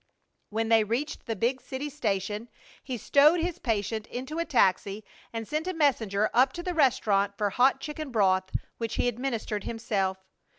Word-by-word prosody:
When 225 +1 -1
they 225 -1 +5
reached 240 +9 -3
the 225 - -1
big 245 +5 0
city 265 +3 -5
station 215 -5 -2 0.3
he 255 -3 -4
stowed 295 - +5
his 345 0 -2
patient 220 -1 -2
into 265 +6 -5
a 335 - 0
taxi 205 - +2 0.3
and 225 -1 -5
sent 310 +3 -2
a 370 - -2
messenger 220 -9 +2
up 260 +2 +4
to 345 - -6
the 360 - -2
restaurant 205 - +2
for 205 -1 0
hot 260 +5 +3
chicken 300 +1 -5
broth, 190 -5 +2 0.3
which 230 -2 -3
he - - +1
administered 235 -4 -2
himself. 200 -5 -1
235 Hz, 170 wpm, -28 LUFS, 210-280 Hz, 0.3 s, they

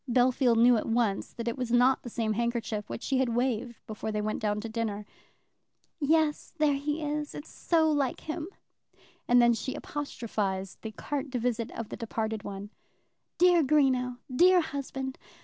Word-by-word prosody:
Bellfield 245 0 +3
knew 240 +1 +6
at - - -3
once 225 -4 0
that 235 0 -6
it 235 - 0
was 250 -2 -2
not 250 +2 +4
the 240 - -7
same 220 -1 -1
handkerchief 230 -2 -2
which - - -5
she 265 -1 +1
had 245 -3 +1
waved 240 -1 -1
before 215 0 -5
they 210 - -1
went 215 +1 -2
down 210 -1 0
to 230 - -5
dinner. 220 -2 -3 0.9
"Yes, 310 +1 +1
there 305 -2 +3
he 295 +3 -2
is. 300 0 -3
It's 295 - -8
so 325 -2 +2
like 280 -4 0
him." 315 +1 -4 0.8
And 245 0 +6
then 235 0 +6
she 245 +3 -3
apostrophized 205 -9 -4
the 220 - -5
carte 280 +5 -4
de 255 - -2
visite 235 -1 -1
of 230 -2 -5
the - - -6
departed 220 -1 -3
one. 200 0 -7 0.7
"Dear 355 -1 +6
Greenow; 260 -4 +2 0.2
dear 360 +4 +6
husband! 270 -3 -5
245 Hz, 175 wpm, -29 LUFS, 225-285 Hz, 0.9 s, knew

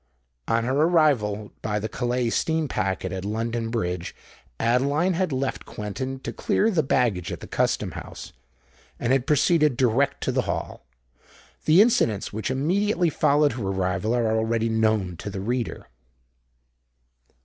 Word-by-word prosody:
On 115 0 +1
her 130 +3 -1
arrival, 140 -10 +2
by 105 -1 -1
the 105 +1 -2
Calais 120 0 -1
steam 160 +3 0
packet, 95 -5 -2
at 95 0 -4
London 115 +2 -2
Bridge, 90 -7 -3 0.4
Adeline 140 +10 +2
had 180 -1 0
left 135 0 -2
Quentin 130 +6 -5
to - - -5
clear 220 +2 +1
the 175 -6 +2
baggage 115 - 0
at - - -5
the - - -9
Custom - - 0
House, - - -9 0.7
and 120 +2 +1
had 135 0 +1
proceeded 150 -2 +3
direct 130 +3 +1
to - - 0
the - - +1
Hall. - - -4 0.8
The 165 +6 +7
incidents 115 - +1
which 110 +3 -3
immediately 175 +6 +1
followed 150 0 +3
her 120 -1 -5
arrival 95 +3 0
are 115 -2 +1
already 115 0 0
known 110 -5 +1
to 100 - -6
the 95 -1 -5
reader. 120 +4 -3
120 Hz, 150 wpm, -25 LUFS, 105-145 Hz, 0.8 s, The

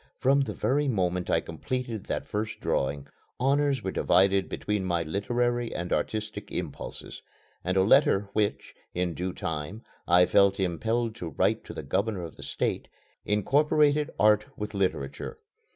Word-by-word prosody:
From 140 +1 +3
the 110 -7 -3
very 135 +9 +1
moment 90 -6 0
I - - +3
completed 125 -5 -4
that - - -3
first 105 +1 -3
drawing, 70 +1 -1 0.3
honors 140 -1 +2
were 95 - -2
divided 95 +2 +3
between 105 -2 -2
my 85 -2 0
literary 120 +7 -1
and 90 +1 -2
artistic 110 -1 -3
impulses; - - -6 0.4
and 95 +2 0
a 95 - +5
letter 100 -3 +4
which, 105 -1 -1 0.2
in 90 -1 0
due 90 +2 -3
time, 80 +7 -5 0.2
I 90 +1 +6
felt 100 +1 +4
impelled 110 +6 0
to 85 -6 -5
write 75 - +1
to - - -9
the - - -5
Governor 95 +6 -1
of 80 - -8
the - - -12
State, - - -2 0.4
incorporated 145 +7 +3
art 105 0 +5
with 105 +1 -5
literature. 90 -8 -2
105 Hz, 150 wpm, -28 LUFS, 90-120 Hz, 0.4 s, I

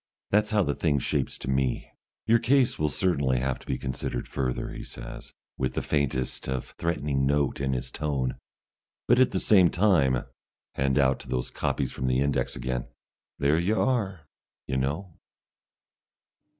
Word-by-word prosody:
That's 105 +1 +3
how 105 -2 +3
the 70 - 0
thing 75 -2 +1
shapes 70 0 -1
to - - -8
me." 65 -1 0 0.3
"Your 115 +1 +5
case 130 +2 +3
will 75 0 +2
certainly 70 -5 +1
have 65 0 -1
to - - -17
be 65 - -1
considered 60 -1 -3
further," 65 -2 -2
he - - -7
says, - - -9 0.3
with 65 - -1
the - - -1
faintest 65 -3 -1
of 65 -1 -3
threatening 75 -5 0
notes 70 -1 +1
in 65 -1 0
his 65 -1 -3
tone. 70 -4 -2 0.7
"But 120 - +5
at 130 - +6
the 95 - -1
same 95 -4 +5
time" 80 - +3 0.5
hand 65 -1 +1
out 65 -1 +3
to 65 - -12
those 65 -1 -2
copies 65 -3 -1
from 65 - -3
the 65 0 +2
index 70 -3 0
again 60 0 -3 0.5
"there 70 +3 +3
you 100 +6 +1
are, 100 - 0 0.4
you 65 - -3
know!" 80 +7 -3
70 Hz, 165 wpm, -27 LUFS, 65-90 Hz, 0.7 s, at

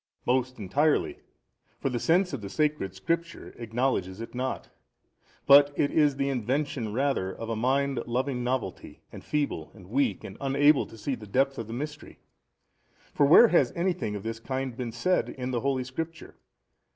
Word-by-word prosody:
A. - - +2
Most 130 0 -1
entirely: 140 +10 +1 0.6
for - - -1
the 120 - -1
sense 180 +5 +2
of 135 - -4
the 100 - -6
sacred 150 -8 -1
Scriptures 170 - -3
acknowledges 115 -5 -1
it 115 - -7
not, 130 +1 -4 0.7
but 140 +1 +8
it 145 - +2
is 150 -3 +3
the 140 0 -1
invention 130 -2 -1
rather 130 -6 0
of 115 +3 -7
a - - -1
mind 135 +3 +1
loving 125 +1 -1
novelty 125 -6 -4
and - - -10
feeble 145 - -2
and 95 -2 -15
weak 140 +3 +1
and - - -9
unable 140 +2 +3
to 115 - -13
see 110 +6 -3
the 110 -4 -7
depth 135 +6 +1
of 115 - -5
the 115 - -6
mystery: 145 +4 -6 1.0
for 140 - +4
where 220 +10 +8
has 140 -8 +3
anything 175 - -1
of 100 - -6
this 115 0 -4
kind 130 +1 -4
been 125 -2 -4
said 160 +11 0
by 125 - -4
the 125 -1 -1
holy 135 -1 0
Scripture? 160 +6 -6
130 Hz, 175 wpm, -27 LUFS, 115-145 Hz, 1.0 s, but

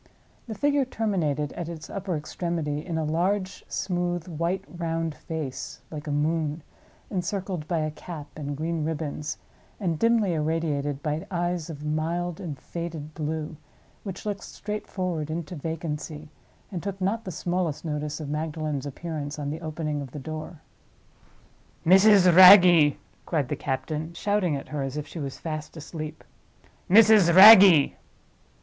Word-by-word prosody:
The 220 - -5
figure 285 +5 +2
terminated 175 - -1
at 170 -1 -5
its 160 -2 -8
upper 195 -3 -4
extremity 155 -1 -3
in 170 -3 -4
a 160 - 0
large, 185 +5 -1
smooth, 175 -2 -2
white 175 +3 -2
round 165 -2 -3
face—like 155 0 -7
a - - -2
moon—encircled 165 +4 -3
by 165 -2 0
a 155 0 -2
cap 155 -1 -8
and 145 -2 -5
green 160 +1 -2
ribbons, 150 -1 -3 0.4
and 170 -6 -1
dimly 230 -5 +3
irradiated 150 -3 -1
by 150 +1 -2
eyes 175 -2 -2
of 150 -2 -7
mild 165 +3 -2
and 155 -6 -6
faded 160 0 -6
blue, 155 0 -4 0.4
which 195 -1 -7
looked 205 -2 -3
straightforward 185 -6 -4
into 165 +2 -4
vacancy, 155 -1 -5 0.4
and 180 -4 -4
took 195 0 -5
not 205 +5 -1
the 185 - -6
smallest 170 -2 -2
notice 150 -1 -3
of 155 - -6
Magdalen's 150 -1 -3
appearance, 150 0 -5
on 145 -1 -3
the 160 +2 -6
opening 155 -2 -3
of 140 - -7
the - - -6
door. 155 +3 -7 1.2
"Mrs. 195 +2 +7
Wragge!" 180 -5 +9 0.3
cried 150 -6 0
the - - -1
captain, 155 +4 -4
shouting 200 -5 0
at 140 - -7
her 150 -2 -3
as 135 +1 -4
if 150 - -3
she 165 - -8
was 140 -3 -5
fast 155 0 -6
asleep. 155 0 -7 0.7
"Mrs. 210 -3 +7
Wragge!" 190 -6 +9
160 Hz, 145 wpm, -26 LUFS, 150-180 Hz, 1.2 s, Wragge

